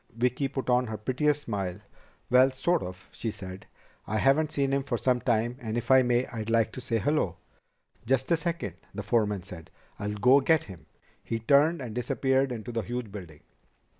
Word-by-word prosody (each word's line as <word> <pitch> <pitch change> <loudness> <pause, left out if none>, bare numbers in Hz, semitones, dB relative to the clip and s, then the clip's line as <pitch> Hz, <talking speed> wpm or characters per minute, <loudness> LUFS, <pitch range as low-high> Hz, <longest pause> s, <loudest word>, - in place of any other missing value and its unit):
Vicki 125 +3 +1
put 135 0 -5
on 125 0 +3
her 110 -1 -4
prettiest 145 +6 0
smile. 95 -4 -3 0.5
"Well, 130 +1 +6
sort 135 +7 0
of," 90 0 -8
she 115 - -4
said. 95 -2 -8 0.4
"I 110 - -1
haven't 140 +6 +3
seen 140 -3 0
him 140 - +2
for 135 -3 -2
some 125 +1 +1
time, 120 0 0
and 110 -1 -3
if 120 +2 -2
I 130 0 +8
may, 125 0 +2
I'd 110 -2 -6
like 115 -1 +2
to 130 - -7
say 115 -1 0
hello." 120 - 0 0.7
"Just 130 +2 +1
a - - +6
second," 165 - -3 0.2
the 105 - -4
foreman 105 -3 +1
said. 85 -3 -10 0.3
"I'll 105 0 -3
go 125 +6 +5
get 160 +2 +3
him." 95 -5 -12 0.4
He 115 - -2
turned 140 +6 +3
and 115 -4 -6
disappeared 130 +2 +1
into 120 0 -5
the 115 -1 -1
huge 120 +1 -5
building. 85 -7 -9
120 Hz, 195 wpm, -28 LUFS, 105-135 Hz, 0.7 s, I